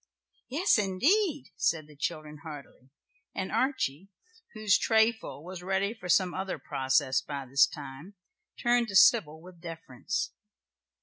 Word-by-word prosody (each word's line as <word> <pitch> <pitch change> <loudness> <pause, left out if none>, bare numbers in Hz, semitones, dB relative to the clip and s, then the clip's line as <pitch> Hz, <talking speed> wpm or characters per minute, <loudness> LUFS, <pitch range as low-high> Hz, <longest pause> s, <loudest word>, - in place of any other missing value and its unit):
"Yes 295 - +2
indeed," 285 - +1
said 160 -2 +1
the 150 0 -17
children 150 0 -4
heartily, 145 -4 -11 0.5
and 190 -1 -3
Archie, 210 - -1 0.5
whose 215 -1 +3
trayful 220 - +1
was 180 +1 -8
ready 195 +3 0
for 180 -6 -10
some 180 0 +3
other 190 -1 -3
process 130 -1 +1
by 140 -2 -6
this 140 +4 +4
time, 145 +7 -10 0.4
turned 240 0 +2
to 200 - -6
Sybil 160 -8 +5
with 175 0 -15
deference. 165 - -4
180 Hz, 130 wpm, -29 LUFS, 150-215 Hz, 0.5 s, Sybil